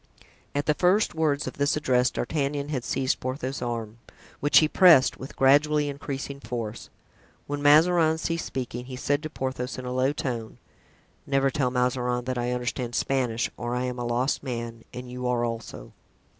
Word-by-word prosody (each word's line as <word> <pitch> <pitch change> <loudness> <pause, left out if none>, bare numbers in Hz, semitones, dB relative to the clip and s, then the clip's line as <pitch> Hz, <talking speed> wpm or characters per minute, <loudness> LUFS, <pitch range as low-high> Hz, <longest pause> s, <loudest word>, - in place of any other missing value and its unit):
(At 145 - 0
the 150 - +3
first 185 +7 +2
words 155 -3 0
of - - -7
this 145 +1 +2
address 125 -4 +2
D'Artagnan 145 +1 -2
had 130 -5 -2
seized 130 +1 0
Porthos's 130 +1 -4
arm, 115 -2 -4 0.4
which 145 - +4
he 155 - +7
pressed 160 -5 +6
with 130 - -9
gradually 145 +2 +4
increasing 140 0 -5
force. 115 -2 -5 0.6
When 145 0 -4
Mazarin 160 +2 +5
ceased 165 +1 -2
speaking 125 -1 -5
he 130 0 -7
said 145 +3 0
to 155 - -5
Porthos 130 -3 -4
in 130 - -6
a 125 - -3
low 130 +2 +2
tone: 120 -6 -4 0.7
"Never 135 -1 +2
tell 135 -4 0
Mazarin 125 -1 0
that 130 -1 -2
I 120 0 -1
understand 125 0 -3
Spanish, 125 -4 0
or 120 0 -3
I 125 - -1
am 125 -1 -3
a - - -2
lost 120 +3 0
man 115 -3 -5
and 125 0 -8
you 125 0 -4
are 120 -1 +1
also." 115 -2 -6
130 Hz, 175 wpm, -26 LUFS, 125-145 Hz, 0.7 s, he